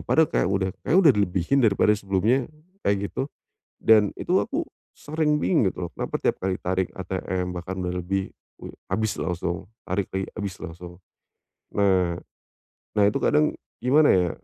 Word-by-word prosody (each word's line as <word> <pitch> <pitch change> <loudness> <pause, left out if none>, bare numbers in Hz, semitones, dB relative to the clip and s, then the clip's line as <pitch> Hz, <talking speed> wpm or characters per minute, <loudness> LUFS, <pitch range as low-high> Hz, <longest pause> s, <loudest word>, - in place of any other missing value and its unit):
Padahal 160 - +3
kayak - - +2
udah 95 -1 0 0.2
kayak 170 - +4
udah 150 - +8
dilebihin 100 +5 +1
daripada 105 -2 +4
sebelumnya, 105 +5 +1 0.3
kayak 100 - 0
gitu. 135 - -2 0.5
Dan 105 -2 +5
itu - - 0
aku - - 0 0.3
sering 150 -1 0
bingung 120 - +2
gitu 90 - -4
loh - - -15
kenapa - - -2
tiap - - +1
kali 95 0 -2
tarik 95 0 -1
ATM, 95 -1 -3
bahkan 95 +2 -5
dah 90 - -2
lebih 90 +2 -2 0.3
u - - -7 0.2
habis 110 -1 -1
langsung 85 0 -3 0.2
tarik 95 +2 0
lagi, 95 0 -2
habis 100 -3 -3
langsung. 85 +1 -9 0.7
Nah, 95 -4 +3 0.8
nah 105 - +2
itu 105 - 0
kadang 150 0 +3 0.2
gimana 145 +5 +5
ya? 90 -2 +3
95 Hz, 160 wpm, -25 LUFS, 90-110 Hz, 0.8 s, udah